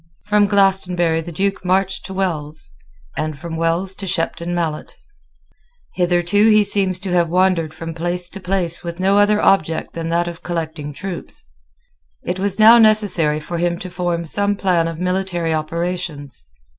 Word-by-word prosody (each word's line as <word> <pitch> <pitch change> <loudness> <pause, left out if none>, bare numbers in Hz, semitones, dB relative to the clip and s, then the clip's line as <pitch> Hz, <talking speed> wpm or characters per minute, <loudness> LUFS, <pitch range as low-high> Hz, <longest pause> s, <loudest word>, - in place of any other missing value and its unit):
From 210 0 +3
Glastonbury 185 -5 +2
the 170 - -8
Duke 195 +4 -2
marched 190 +1 0
to 190 - -7
Wells, 155 - -3 0.4
and 155 -2 -3
from 165 +2 -7
Wells 165 +3 -1
to 195 - -6
Shepton 170 0 -2
Mallet. 160 -3 -4 1.0
Hitherto 180 +4 +2
he 215 -1 +5
seems 195 -3 +2
to 190 -2 -4
have 175 -2 +2
wandered 180 -3 +1
from 165 +1 -7
place 175 +2 0
to 195 - -6
place 180 -3 -2
with 170 0 -6
no 195 +2 +3
other 210 +1 +3
object 165 -6 +1
than 165 0 -4
that 170 +1 0
of 170 0 -7
collecting 160 -3 -4
troops. 180 +4 -7 0.8
It 180 - -3
was 195 0 -1
now 225 +2 +8
necessary 200 -9 +4
for 170 +2 -5
him 175 0 0
to 185 +1 -8
form 175 -1 -2
some 205 +5 0
plan 180 -4 +1
of 165 -1 -5
military 180 -2 -1
operations. 155 - -4
175 Hz, 160 wpm, -19 LUFS, 165-195 Hz, 1.0 s, now